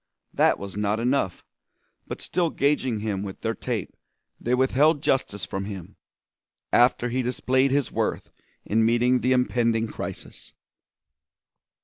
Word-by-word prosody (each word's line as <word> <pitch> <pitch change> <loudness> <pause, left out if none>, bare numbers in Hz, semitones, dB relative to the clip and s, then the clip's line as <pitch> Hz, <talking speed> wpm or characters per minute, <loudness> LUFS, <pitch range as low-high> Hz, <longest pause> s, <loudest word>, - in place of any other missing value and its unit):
That - - +3
was 100 -1 -8
not 105 +1 0
enough, 120 -6 0 0.6
but - - -5
still 175 -2 0
gaging 135 -7 0
him 105 -3 -2
with 100 -1 -7
their 115 0 -1
tape 115 -4 -4 0.4
they 125 +1 +1
withheld 140 +4 +3
justice 100 -8 0
from 95 +3 -4
him, 95 -4 -8 0.8
after 120 0 +4
he 130 +2 0
displayed 130 +2 +1
his 140 -1 0
worth - - -2 0.3
in 110 +2 +2
meeting 120 +2 +3
the 130 - +1
impending 115 -3 +2
crisis. - - -7
120 Hz, 130 wpm, -25 LUFS, 105-130 Hz, 0.8 s, after